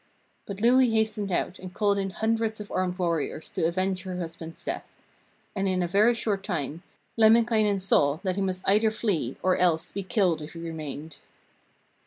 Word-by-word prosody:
But 200 Hz, 0 st, -6 dB
Louhi 250 Hz, +2 st, +5 dB
hastened 220 Hz, -2 st, 0 dB
out 180 Hz, +1 st, -1 dB
and 185 Hz, -1 st, -9 dB
called 205 Hz, -1 st, +2 dB
in 195 Hz, 0 st, -1 dB
hundreds 220 Hz, +3 st, -1 dB
of 210 Hz, -, -8 dB
armed 185 Hz, -1 st, -1 dB
warriors 165 Hz, -3 st, -2 dB
to 160 Hz, -, 0 dB
avenge 185 Hz, +2 st, -1 dB
her 185 Hz, -1 st, -5 dB
husband's 165 Hz, -1 st, -7 dB
death. -, -, -4 dB, 0.7 s
And 195 Hz, 0 st, 0 dB
in 185 Hz, -1 st, +1 dB
a -, -, 0 dB
very 210 Hz, +6 st, +4 dB
short 205 Hz, -4 st, -1 dB
time 165 Hz, -4 st, -3 dB, 0.4 s
Lemminkainen 220 Hz, -2 st, +4 dB
saw 145 Hz, -6 st, +3 dB
that 185 Hz, -2 st, -1 dB
he 200 Hz, -, -2 dB
must 185 Hz, -1 st, -2 dB
either 210 Hz, +3 st, +4 dB
flee 195 Hz, -, -1 dB
or 185 Hz, -1 st, +3 dB
else 170 Hz, -3 st, +1 dB
be 200 Hz, -, -4 dB
killed 185 Hz, -5 st, +1 dB
if 150 Hz, +2 st, -8 dB
he 165 Hz, -, -8 dB
remained. 160 Hz, -2 st, -7 dB
190 Hz, 180 wpm, -27 LUFS, 170-215 Hz, 0.7 s, Louhi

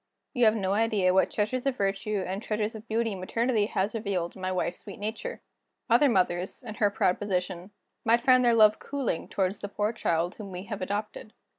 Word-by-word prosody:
You 245 Hz, -2 st, +3 dB
have 215 Hz, 0 st, +5 dB
no 195 Hz, -3 st, 0 dB
idea 210 Hz, -4 st, +2 dB
what 190 Hz, -, +4 dB
treasures 245 Hz, +5 st, -1 dB
of 265 Hz, -2 st, 0 dB
virtue 195 Hz, 0 st, -1 dB
and 190 Hz, +2 st, -4 dB
treasures 215 Hz, 0 st, -2 dB
of 220 Hz, +1 st, -10 dB
beauty 225 Hz, 0 st, 0 dB
maternity 215 Hz, +3 st, 0 dB
has 200 Hz, 0 st, -1 dB
revealed 200 Hz, -6 st, -2 dB
in 190 Hz, -, -11 dB
my 185 Hz, 0 st, -1 dB
wife's 180 Hz, -1 st, -2 dB
sweet 200 Hz, -, -10 dB
nature. 220 Hz, -, -5 dB, 0.5 s
Other 270 Hz, +5 st, +6 dB
mothers, 185 Hz, +1 st, 0 dB
in 220 Hz, -3 st, -6 dB
her 210 Hz, -1 st, +2 dB
proud 185 Hz, -2 st, +1 dB
position, 185 Hz, -2 st, -2 dB, 0.3 s
might 230 Hz, +1 st, +3 dB
find 255 Hz, 0 st, +5 dB
their 240 Hz, -1 st, +4 dB
love 215 Hz, -1 st, +6 dB
cooling 275 Hz, -11 st, -3 dB
toward 190 Hz, -1 st, 0 dB
the 205 Hz, -1 st, -7 dB
poor 210 Hz, +2 st, -1 dB
child 170 Hz, -3 st, 0 dB
whom 200 Hz, -3 st, -8 dB
we 180 Hz, 0 st, -6 dB
have 205 Hz, -2 st, -6 dB
adopted. 210 Hz, +3 st, -4 dB
210 Hz, 200 wpm, -28 LUFS, 190-225 Hz, 0.5 s, Other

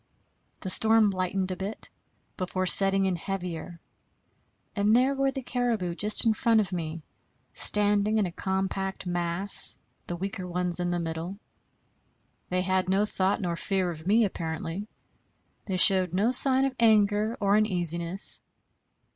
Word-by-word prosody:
The 190 Hz, -, -1 dB
storm 220 Hz, -1 st, +6 dB
lightened 185 Hz, 0 st, -2 dB
a -, -, -3 dB
bit, 195 Hz, +4 st, -6 dB, 0.5 s
before 185 Hz, 0 st, -3 dB
setting 195 Hz, +1 st, +3 dB
in 190 Hz, -1 st, -1 dB
heavier; 175 Hz, -1 st, -6 dB, 1.0 s
and 210 Hz, +1 st, +2 dB
there 260 Hz, +3 st, +2 dB
were 275 Hz, 0 st, 0 dB
the 270 Hz, -1 st, -6 dB
caribou 235 Hz, -8 st, -2 dB
just 210 Hz, +6 st, +1 dB
in 225 Hz, -, +3 dB
front 225 Hz, 0 st, +1 dB
of 195 Hz, -3 st, -2 dB
me, 165 Hz, -2 st, -5 dB, 0.5 s
standing 210 Hz, +1 st, +2 dB
in 210 Hz, -, +1 dB
a 175 Hz, -, -5 dB
compact 190 Hz, +1 st, -4 dB
mass, 175 Hz, +2 st, 0 dB, 0.3 s
the 175 Hz, -, -5 dB
weaker 190 Hz, +1 st, -6 dB
ones 180 Hz, 0 st, -3 dB
in 175 Hz, 0 st, -2 dB
the 175 Hz, -, -2 dB
middle. 165 Hz, +3 st, -6 dB, 1.1 s
They 185 Hz, 0 st, -1 dB
had 185 Hz, 0 st, -1 dB
no 195 Hz, +2 st, +1 dB
thought 195 Hz, +1 st, -2 dB
nor 175 Hz, -3 st, -3 dB
fear 185 Hz, 0 st, -2 dB
of 160 Hz, +1 st, -10 dB
me 220 Hz, +3 st, +3 dB
apparently; 165 Hz, +2 st, -6 dB, 0.8 s
they 190 Hz, -2 st, -2 dB
showed 185 Hz, -2 st, +3 dB
no 210 Hz, +6 st, +1 dB
sign 265 Hz, +1 st, +5 dB
of 270 Hz, -1 st, -3 dB
anger 215 Hz, 0 st, +2 dB
or 200 Hz, 0 st, +1 dB
uneasiness. 175 Hz, -3 st, +3 dB
190 Hz, 145 wpm, -26 LUFS, 180-210 Hz, 1.1 s, storm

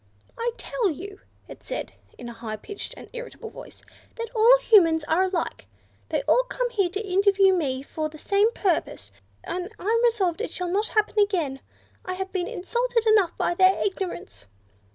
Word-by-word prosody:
"I 465 Hz, +1 st, -1 dB
tell 465 Hz, -6 st, -1 dB
you," 395 Hz, +6 st, -7 dB, 0.3 s
it -, -, -11 dB
said -, -, -5 dB, 0.2 s
in 245 Hz, -, -8 dB
a 235 Hz, -, -7 dB
high 225 Hz, -1 st, -6 dB
pitched 400 Hz, -, -8 dB
and -, -, -11 dB
irritable 485 Hz, -1 st, -8 dB
voice, -, -, -12 dB, 0.3 s
"that 465 Hz, 0 st, -5 dB
all 460 Hz, +3 st, +7 dB
Humans 335 Hz, -10 st, +5 dB
are 320 Hz, +4 st, +1 dB
alike! 365 Hz, -3 st, -3 dB, 0.4 s
They -, -, -1 dB
all -, -, +4 dB
come -, -, -2 dB
here 395 Hz, -6 st, +1 dB
to 400 Hz, +4 st, -5 dB
interview 390 Hz, 0 st, +4 dB
me 270 Hz, -7 st, -1 dB
for 310 Hz, +2 st, -4 dB
the 310 Hz, -, -12 dB
same 405 Hz, +7 st, +2 dB
purpose, 330 Hz, -, -1 dB, 0.3 s
and 360 Hz, +2 st, -4 dB
I'm 455 Hz, +4 st, +1 dB
resolved 425 Hz, -6 st, +1 dB
it 465 Hz, -, -2 dB
shall 360 Hz, -1 st, -4 dB
not 410 Hz, +4 st, 0 dB
happen 425 Hz, -1 st, +1 dB
again; 345 Hz, -10 st, +1 dB, 0.4 s
I 370 Hz, -, -4 dB
have 380 Hz, 0 st, -5 dB
been 360 Hz, -2 st, -1 dB
insulted 475 Hz, +5 st, -1 dB
enough 425 Hz, -5 st, +3 dB
by -, -, +1 dB
their 375 Hz, +2 st, +4 dB
ignorance." 355 Hz, -, -5 dB
385 Hz, 175 wpm, -25 LUFS, 340-440 Hz, 0.4 s, all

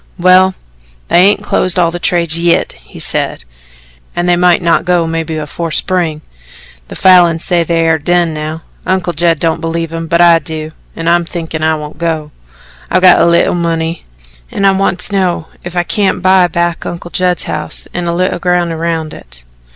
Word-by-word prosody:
"Well, 185 Hz, +1 st, +4 dB, 0.5 s
they 175 Hz, +2 st, +5 dB
hain't 205 Hz, 0 st, +1 dB
closed 185 Hz, -3 st, 0 dB
all 170 Hz, -2 st, +2 dB
the 175 Hz, -, -5 dB
trades 170 Hz, -2 st, 0 dB
yit," 170 Hz, 0 st, +1 dB
he -, -, -15 dB
said, -, -, -2 dB, 0.7 s
"an' 175 Hz, -, -1 dB
they 175 Hz, 0 st, +3 dB
mought 175 Hz, 0 st, +3 dB
not 170 Hz, -1 st, +2 dB
go 180 Hz, -2 st, +1 dB
mebbe 160 Hz, -1 st, -3 dB
afore 160 Hz, +3 st, -4 dB
spring. 165 Hz, -2 st, 0 dB, 0.7 s
The -, -, -9 dB
Falins 175 Hz, -3 st, +4 dB
say 175 Hz, -1 st, +1 dB
they 165 Hz, 0 st, 0 dB
air 160 Hz, -1 st, +2 dB
done 175 Hz, +1 st, +1 dB
now. 155 Hz, +1 st, -5 dB, 0.2 s
Uncle 185 Hz, -2 st, 0 dB
Judd 170 Hz, 0 st, +2 dB
don't 165 Hz, 0 st, 0 dB
believe 165 Hz, 0 st, -3 dB
'em, 165 Hz, 0 st, -4 dB
but 170 Hz, +2 st, +1 dB
I 170 Hz, -1 st, +6 dB
do, 155 Hz, 0 st, -6 dB, 0.2 s
an' 165 Hz, -, -5 dB
I'm 175 Hz, 0 st, +3 dB
thinkin' 165 Hz, -2 st, -5 dB
I 160 Hz, 0 st, +2 dB
won't 150 Hz, 0 st, -8 dB
go. 160 Hz, -3 st, -2 dB, 0.6 s
I've 185 Hz, +2 st, +1 dB
got 180 Hz, -1 st, +7 dB
a -, -, +4 dB
leetle 170 Hz, 0 st, +3 dB
money, 165 Hz, -1 st, -2 dB, 0.5 s
an' 200 Hz, -, -2 dB
I 195 Hz, -, +6 dB
want 195 Hz, -1 st, 0 dB
to -, -, -5 dB
know 180 Hz, -4 st, 0 dB, 0.2 s
if 175 Hz, 0 st, -7 dB
I 175 Hz, -, +2 dB
can't 195 Hz, 0 st, -1 dB
buy 185 Hz, -1 st, +4 dB
back 170 Hz, 0 st, -1 dB
Uncle 175 Hz, 0 st, -7 dB
Judd's 180 Hz, -1 st, 0 dB
house -, -, -4 dB
an' 175 Hz, -1 st, -3 dB
a 170 Hz, -, -1 dB
leetle 185 Hz, 0 st, -1 dB
ground 175 Hz, -1 st, 0 dB
around 165 Hz, -1 st, -3 dB
it. -, -, -9 dB
170 Hz, 190 wpm, -13 LUFS, 165-180 Hz, 0.7 s, got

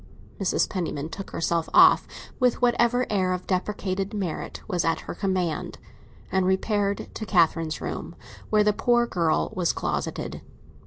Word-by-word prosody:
Mrs. 195 Hz, -, +1 dB
Penniman 160 Hz, -6 st, -3 dB
took 195 Hz, +4 st, -7 dB
herself 165 Hz, 0 st, -1 dB
off, -, -, +7 dB, 0.3 s
with 250 Hz, -2 st, +2 dB
whatever 245 Hz, 0 st, +3 dB
air 185 Hz, -3 st, +1 dB
of 180 Hz, 0 st, -4 dB
depreciated 195 Hz, +1 st, -2 dB
merit 185 Hz, -6 st, -4 dB
was 180 Hz, -4 st, 0 dB
at 165 Hz, 0 st, 0 dB
her -, -, -6 dB
command, 185 Hz, -5 st, -2 dB, 0.5 s
and 190 Hz, -1 st, +2 dB
repaired 200 Hz, +1 st, 0 dB
to -, -, -5 dB
Catherine's 165 Hz, -5 st, +2 dB
room, -, -, -5 dB, 0.3 s
where 210 Hz, -1 st, +4 dB
the 210 Hz, 0 st, +3 dB
poor 240 Hz, +2 st, +2 dB
girl 170 Hz, -8 st, 0 dB
was 180 Hz, -2 st, +1 dB
closeted. -, -, -3 dB
190 Hz, 145 wpm, -25 LUFS, 175-210 Hz, 0.5 s, off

